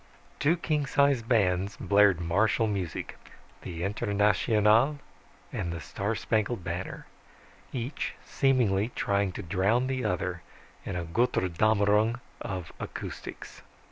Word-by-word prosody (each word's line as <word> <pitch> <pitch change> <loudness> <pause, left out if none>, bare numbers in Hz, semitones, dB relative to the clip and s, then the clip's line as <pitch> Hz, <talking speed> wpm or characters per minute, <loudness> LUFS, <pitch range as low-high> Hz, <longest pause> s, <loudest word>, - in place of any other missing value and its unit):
_ - - -29
Two 155 +4 +3
king 150 -4 -1
sized 140 -5 +2
bands 100 -4 +2
blared 100 -3 +4
martial 100 +7 +2
music, 95 -6 -4 0.4
the 85 -1 -5
"Internationale" 105 +6 +3 0.6
and 85 - -2
the 85 - -4
"Star 100 +7 -3
Spangled 110 -2 -1
Banner," 90 +2 -5 0.7
each 125 +3 -3
seemingly 120 -6 +2
trying 100 -5 +1
to - - -6
drown 100 +8 +1
the 130 -1 -2
other 90 -3 -1 0.5
in 95 - -3
a 85 -1 -3
Götterdämmerung 105 +3 +2 0.2
of 90 -4 -5
acoustics. - - -7
105 Hz, 115 wpm, -28 LUFS, 95-120 Hz, 0.7 s, blared